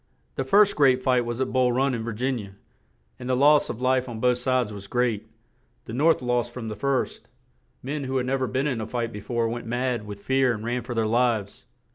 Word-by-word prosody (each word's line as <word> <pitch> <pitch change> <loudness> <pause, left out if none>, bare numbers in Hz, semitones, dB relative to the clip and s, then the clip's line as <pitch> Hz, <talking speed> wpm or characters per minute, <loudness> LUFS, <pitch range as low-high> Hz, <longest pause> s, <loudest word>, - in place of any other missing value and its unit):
The 135 - -2
first 200 +10 +4
great 130 -3 +4
fight 125 -2 +2
was 120 +1 -4
at 130 - -2
Bull 130 -1 +3
Run 135 +2 +1
in 115 - -2
Vir 115 0 -4
gin 125 +3 -1
i - - -4
a; - - -12 0.7
and 125 - -6
the 130 - +2
loss 145 +3 +4
of 125 +2 -5
life 130 0 +2
on 115 -2 -6
both 125 +1 +2
sides 125 -4 0
was 100 -1 -8
great; 120 -2 0 0.6
the 115 - -8
North 150 +2 +3
lost 120 -1 0
from 120 -2 -6
the 105 - -5
first; 135 +4 -2 0.6
men 140 +2 -3
who 130 0 -1
had 125 - 0
nev 135 +1 -1
er 130 - +1
been 130 +3 -1
in 125 -6 -1
a 110 - -4
fight 115 -1 -3
be 105 - -6
fore 115 +2 -1
went 115 0 -5
mad 120 -2 -2
with 100 -1 -8
fear 130 -2 +3
and 110 0 -6
ran 120 +1 -1
for 120 +1 -6
their 115 -1 +1
lives. 115 -3 0
125 Hz, 245 wpm, -25 LUFS, 115-130 Hz, 0.7 s, first